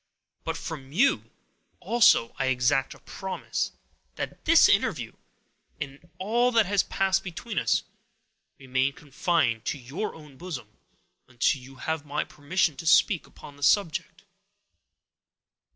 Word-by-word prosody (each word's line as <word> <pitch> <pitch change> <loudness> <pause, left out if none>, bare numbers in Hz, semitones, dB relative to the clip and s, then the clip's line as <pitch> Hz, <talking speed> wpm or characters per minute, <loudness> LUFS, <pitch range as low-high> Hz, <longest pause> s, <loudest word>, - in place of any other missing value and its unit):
But - - -3
from 135 -4 -7
you, 260 - +3 0.5
also, 235 - +4
I 135 - +1
exact 130 +1 +1
a - - -17
promise, 190 -1 -4 0.4
that - - -6
this 330 0 +7
interview, - - +1 0.7
and 145 +3 -8
all 235 +6 +2
that 225 -2 +5
has 200 0 +2
passed 195 0 0
between 195 +4 -4
us, - - +1 0.7
remain 130 +1 0
confined 140 -5 0
to - - -2
your 135 - -5
own 150 -4 -14
bosom, 145 -11 -7 0.6
until 130 +2 +1
you 135 +2 -13
have 160 +3 -3
my 150 0 -2
permission 155 +2 0
to 165 - -6
speak 175 +1 +4
upon 145 - -14
the - - -17
subject." 160 +3 +1
155 Hz, 130 wpm, -27 LUFS, 135-190 Hz, 0.7 s, this